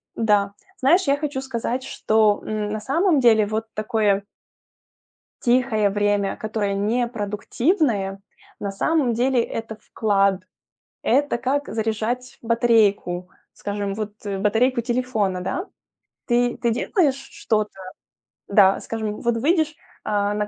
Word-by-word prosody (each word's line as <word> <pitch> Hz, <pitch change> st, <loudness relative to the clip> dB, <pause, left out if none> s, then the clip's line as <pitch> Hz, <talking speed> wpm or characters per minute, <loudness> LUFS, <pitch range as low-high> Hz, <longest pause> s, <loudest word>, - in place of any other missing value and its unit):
да, 205 Hz, -3 st, +2 dB, 0.3 s
знаешь, 335 Hz, +8 st, +4 dB
я 280 Hz, +1 st, +3 dB
хочу 285 Hz, -3 st, -3 dB
сказать, 255 Hz, -1 st, -3 dB
что, 215 Hz, -5 st, +2 dB
м, 210 Hz, -1 st, -2 dB
на 215 Hz, -, -2 dB
самом 310 Hz, -, +2 dB
деле 225 Hz, -4 st, +5 dB
вот 220 Hz, +1 st, -2 dB
такое 215 Hz, -2 st, +1 dB, 1.2 s
Тихое 240 Hz, -4 st, +2 dB
время, 205 Hz, -1 st, +1 dB
которое 215 Hz, -2 st, -2 dB
не 220 Hz, +5 st, 0 dB
продуктивное, 215 Hz, -, -1 dB, 0.4 s
на 200 Hz, -, -3 dB
самом 265 Hz, +4 st, +1 dB
деле 250 Hz, +2 st, +2 dB
это 225 Hz, -1 st, -6 dB
вклад. 200 Hz, -4 st, +1 dB, 0.6 s
Это 275 Hz, +1 st, +2 dB
как 280 Hz, +4 st, -1 dB
заряжать 225 Hz, +3 st, -2 dB
батарейку, 220 Hz, -6 st, +2 dB, 0.2 s
скажем, 205 Hz, -1 st, -4 dB
вот, 215 Hz, 0 st, -4 dB
э, 200 Hz, -1 st, -2 dB
батарейку 225 Hz, +5 st, +2 dB
телефона, 235 Hz, -6 st, -1 dB
да? 360 Hz, -, -3 dB, 0.6 s
Ты 240 Hz, 0 st, +2 dB
ты 235 Hz, -, 0 dB
делаешь 280 Hz, -, +1 dB, 0.2 s
что-то, 215 Hz, -1 st, -1 dB, 0.8 s
да, 195 Hz, -1 st, +5 dB
скажем, 220 Hz, -2 st, -4 dB
вот 235 Hz, -1 st, +1 dB
выйдешь, 310 Hz, +4 st, +2 dB, 0.3 s
э, -, -, -3 dB
на 205 Hz, 0 st, 0 dB
220 Hz, 125 wpm, -22 LUFS, 205-250 Hz, 1.2 s, деле